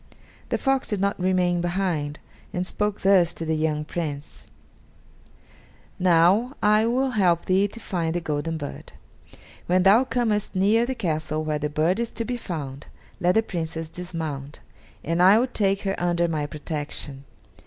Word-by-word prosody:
The -, -, +1 dB
fox 270 Hz, -1 st, 0 dB
did 210 Hz, -, -2 dB
not 200 Hz, 0 st, 0 dB
remain 180 Hz, -1 st, +1 dB
behind, 175 Hz, -5 st, -1 dB, 0.4 s
and 180 Hz, +1 st, -1 dB
spoke 210 Hz, +2 st, -2 dB
thus 185 Hz, -3 st, +4 dB
to 165 Hz, -, -5 dB
the 160 Hz, 0 st, 0 dB
young 155 Hz, -1 st, -1 dB
Prince: 150 Hz, -3 st, -6 dB, 1.5 s
"Now 185 Hz, -, +4 dB
I 215 Hz, +2 st, +4 dB
will 260 Hz, +3 st, +1 dB
help 180 Hz, -7 st, +2 dB
thee 190 Hz, +2 st, +3 dB
to 230 Hz, -, -9 dB
find 170 Hz, -6 st, -2 dB
the -, -, +1 dB
golden 160 Hz, 0 st, -2 dB
bird. 145 Hz, -2 st, -8 dB, 0.7 s
When 180 Hz, +1 st, +3 dB
thou 205 Hz, +6 st, +6 dB
comest 225 Hz, -5 st, -1 dB
near 215 Hz, +5 st, +3 dB
the 260 Hz, -, -2 dB
castle 155 Hz, -6 st, -2 dB
where 155 Hz, -1 st, -1 dB
the 150 Hz, 0 st, -2 dB
bird 160 Hz, +7 st, +1 dB
is 235 Hz, -1 st, -1 dB
to 230 Hz, -, -3 dB
be 245 Hz, -, -2 dB
found, 150 Hz, -, -6 dB, 0.3 s
let 180 Hz, 0 st, +2 dB
the 220 Hz, -, +4 dB
Princess 165 Hz, -4 st, -4 dB
dismount, 160 Hz, -6 st, -6 dB, 0.4 s
and 165 Hz, +2 st, 0 dB
I 190 Hz, +4 st, +7 dB
will 240 Hz, -, +3 dB
take 200 Hz, -6 st, 0 dB
her 195 Hz, -1 st, 0 dB
under 175 Hz, -1 st, +1 dB
my 155 Hz, -3 st, -2 dB
protection. 145 Hz, -2 st, -5 dB
175 Hz, 165 wpm, -24 LUFS, 155-205 Hz, 1.5 s, I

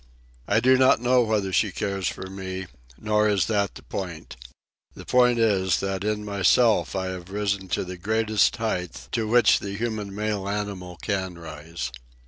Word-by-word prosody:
I 105 Hz, -, +3 dB
do 130 Hz, +2 st, +4 dB
not 130 Hz, -2 st, +5 dB
know 125 Hz, +1 st, +3 dB
whether 105 Hz, -4 st, 0 dB
she 100 Hz, +1 st, +2 dB
cares 95 Hz, -1 st, -2 dB
for -, -, -4 dB
me. 95 Hz, 0 st, -6 dB, 0.3 s
Nor 105 Hz, 0 st, +2 dB
is 100 Hz, -3 st, +2 dB
that 100 Hz, -3 st, 0 dB
the -, -, -11 dB
point. 90 Hz, -9 st, -6 dB, 0.6 s
The -, -, -10 dB
point 125 Hz, -1 st, +4 dB
is 95 Hz, -5 st, +2 dB
that 95 Hz, -1 st, -2 dB
in 105 Hz, 0 st, -1 dB
myself 105 Hz, +4 st, +3 dB
I 95 Hz, -1 st, -1 dB
have 90 Hz, -1 st, -7 dB
risen 100 Hz, -1 st, -2 dB
to 90 Hz, -, -1 dB
the 90 Hz, 0 st, -7 dB
greatest 110 Hz, +2 st, +2 dB
height 90 Hz, -, -4 dB
to 110 Hz, -1 st, -1 dB
which 120 Hz, +2 st, +5 dB
the 100 Hz, -1 st, -5 dB
human 105 Hz, -3 st, -3 dB
male 105 Hz, -2 st, -2 dB
animal 100 Hz, -4 st, -4 dB
can 95 Hz, -4 st, -2 dB
rise. 80 Hz, -4 st, -6 dB
100 Hz, 170 wpm, -25 LUFS, 95-110 Hz, 0.6 s, not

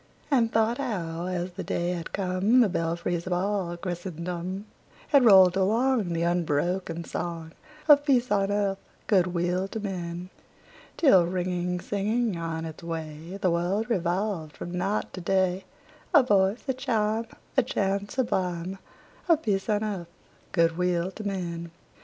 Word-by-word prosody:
And 235 Hz, -5 st, +3 dB
thought 225 Hz, +3 st, +2 dB
how, 175 Hz, -10 st, -3 dB
as 180 Hz, 0 st, -2 dB
the 185 Hz, +2 st, -6 dB
day 175 Hz, +1 st, -1 dB
had 170 Hz, -2 st, -5 dB
come, 195 Hz, +6 st, +2 dB
The 225 Hz, -, +4 dB
belfries 170 Hz, 0 st, -2 dB
of 180 Hz, -, 0 dB
all 185 Hz, -1 st, -1 dB
Christendom 180 Hz, +1 st, -4 dB, 0.4 s
Had 280 Hz, -3 st, +6 dB
rolled 190 Hz, -4 st, +8 dB
along 220 Hz, 0 st, +2 dB
The 165 Hz, 0 st, 0 dB
unbroken 170 Hz, +1 st, 0 dB
song 165 Hz, -1 st, -5 dB, 0.4 s
Of 290 Hz, -2 st, +7 dB
peace 255 Hz, -5 st, +2 dB
on 200 Hz, -1 st, +2 dB
earth, 200 Hz, -1 st, 0 dB, 0.3 s
good 185 Hz, -4 st, +3 dB
will 180 Hz, +2 st, 0 dB
to 220 Hz, -, -5 dB
men! 180 Hz, -3 st, -5 dB, 0.7 s
Till, 190 Hz, -, +5 dB
ringing, 180 Hz, 0 st, -1 dB
singing 210 Hz, +3 st, -1 dB
on 165 Hz, -1 st, -3 dB
its 160 Hz, -1 st, -8 dB
way, 165 Hz, +1 st, -6 dB
The 185 Hz, -2 st, +2 dB
world 190 Hz, +7 st, 0 dB
revolved 180 Hz, -4 st, -1 dB
from 175 Hz, +1 st, -6 dB
night 195 Hz, +4 st, -1 dB
to 185 Hz, -, -6 dB
day, 190 Hz, +1 st, +1 dB, 0.5 s
A 290 Hz, -, +8 dB
voice, 200 Hz, -1 st, +2 dB
a 265 Hz, -, +1 dB
chime, 225 Hz, -4 st, 0 dB, 0.3 s
A 265 Hz, -, +6 dB
chant 200 Hz, -4 st, -1 dB
sublime 185 Hz, -7 st, -2 dB, 0.5 s
Of 325 Hz, -2 st, +4 dB
peace 195 Hz, -1 st, 0 dB
on 210 Hz, 0 st, +1 dB
earth, 190 Hz, -6 st, -4 dB, 0.4 s
good 165 Hz, -1 st, +2 dB
will 180 Hz, 0 st, +1 dB
to 215 Hz, -, -8 dB
men! 170 Hz, -4 st, -4 dB
185 Hz, 150 wpm, -27 LUFS, 175-210 Hz, 0.7 s, rolled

